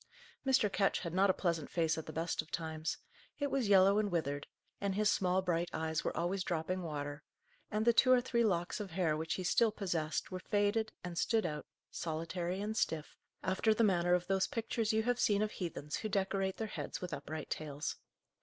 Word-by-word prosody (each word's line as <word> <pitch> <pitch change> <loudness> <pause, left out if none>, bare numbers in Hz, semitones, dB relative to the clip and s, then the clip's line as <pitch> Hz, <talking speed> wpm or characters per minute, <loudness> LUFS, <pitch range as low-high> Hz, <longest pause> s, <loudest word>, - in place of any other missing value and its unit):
Mr. 265 -5 +4
Ketch 195 0 +1
had 170 -3 -4
not 195 +2 +4
a - - +5
pleasant 170 -6 -1
face 165 -2 +1
at 160 - -6
the - - -5
best 165 +2 -1
of - - -17
times: 160 -1 -3 0.4
it 285 -2 -1
was 265 -5 +1
yellow 195 +1 +6
and 205 -2 0
withered; 145 -4 -1 0.3
and 200 -1 0
his 210 0 +3
small 185 0 +2
bright 175 -1 0
eyes 160 0 -1
were - - -2
always 185 +3 0
dropping 180 +1 -1
water; 145 -3 -4 0.5
and 215 +1 0
the 235 - +6
two 255 +2 +5
or 255 - +7
three 240 -1 +1
locks 175 -4 0
of 205 -2 -4
hair, 165 -3 +1
which 160 +1 -2
he 185 - -3
still 220 +5 +3
possessed, 170 -7 -2
were 185 - -3
faded, 205 +3 +1
and 175 -1 -3
stood 225 -3 +2
out, 150 -3 -4 0.2
solitary 170 +3 -3
and 215 +1 -2
stiff, 155 -2 -1 0.3
after 205 +4 +2
the 230 - +3
manner 175 -3 +4
of 180 0 -1
those 190 +1 +2
pictures 225 -1 -1
you 220 0 +2
have 245 +1 +1
seen 205 0 +3
of 215 - -1
heathens 155 -5 -4
who 215 - -3
decorate 195 -1 0
their 225 - -2
heads 210 - -5
with 180 -3 -5
upright 150 +2 -5
tails. 150 -1 -3
185 Hz, 210 wpm, -34 LUFS, 160-210 Hz, 0.5 s, or